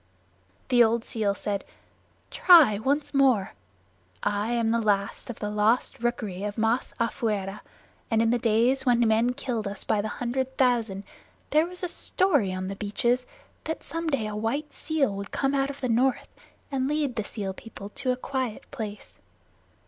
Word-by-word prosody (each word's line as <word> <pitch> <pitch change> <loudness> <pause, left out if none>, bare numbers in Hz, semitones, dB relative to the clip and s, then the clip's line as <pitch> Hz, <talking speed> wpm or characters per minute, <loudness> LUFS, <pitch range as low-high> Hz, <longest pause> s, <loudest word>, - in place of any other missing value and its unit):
The 245 -2 +6
old 230 0 +2
seal 210 -4 -1
said, 200 -1 -3 0.7
"Try 310 - +7
once 280 +6 0
more. 260 -8 +3 0.7
I 205 +2 0
am 230 -1 +1
the 230 0 +2
last 200 0 0
of 240 - -5
the 210 -1 -3
Lost 210 +4 +1
Rookery 220 -5 -2
of 205 0 -3
Masafuera, 225 -3 -1 0.5
and 225 - +2
in 225 0 +3
the 240 - +2
days 235 +4 +2
when 240 -3 +3
men 230 +3 +2
killed 230 -6 -3
us 200 0 -5
by 210 - +1
the 215 - -3
hundred 260 +3 -3
thousand 230 -6 +1 0.5
there 310 +2 +4
was 360 +1 -10
a - - +1
story 330 - +1
on 185 0 -3
the 195 - -4
beaches 240 +5 0 0.4
that 320 - -4
some 330 0 -4
day 275 -8 0
a 210 0 -4
white 280 +8 -2
seal 300 -8 0
would 200 0 -6
come 270 0 0
out 275 0 +1
of 280 0 -8
the 255 - 0
North 245 +2 +1 0.4
and 265 -1 0
lead 290 -3 0
the 215 - -1
seal 200 -2 -5
people 205 0 -10
to 255 +4 -2
a - - +1
quiet 255 -3 -3
place. 215 -5 -7
235 Hz, 170 wpm, -26 LUFS, 210-265 Hz, 0.7 s, Try